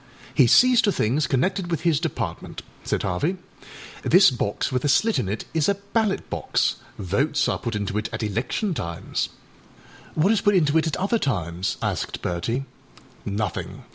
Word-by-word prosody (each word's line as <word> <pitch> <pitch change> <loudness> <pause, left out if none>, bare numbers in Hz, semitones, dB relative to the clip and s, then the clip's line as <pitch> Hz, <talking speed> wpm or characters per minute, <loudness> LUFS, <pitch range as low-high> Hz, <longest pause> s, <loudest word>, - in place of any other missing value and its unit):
âHe 125 - +5
sees 250 - +6
to 205 - +2
things 140 - +1
connected 180 +7 0
with 165 -2 -1
his 165 -4 +2
Department,â 120 - -4 0.2
said - - -1
Harvey. 150 - -1 0.6
âThis 180 -6 +5
box 105 +3 -1
with 125 -1 -1
a 145 - +1
slit 215 - +3
in 105 -7 -2
it 105 +2 -3
is 160 0 +2
a 200 - +2
ballot 200 +1 -1
box. - - 0 0.2
Votes 140 - 0
are - - -1
put 115 -2 -3
into 100 -1 -3
it 110 - -4
at 110 +1 -4
election 120 - -1
times.â 85 - -3 0.9
âWhat 185 +7 +4
is 225 - +2
put 205 -1 +3
into 155 -4 +3
it 160 - -1
at 160 - -2
other 205 +5 +1
times?â 90 - -2
asked - - -3
Bertie. 115 +10 -2 0.6
âNothing. 105 +1 -3
145 Hz, 170 wpm, -24 LUFS, -, 0.9 s, sees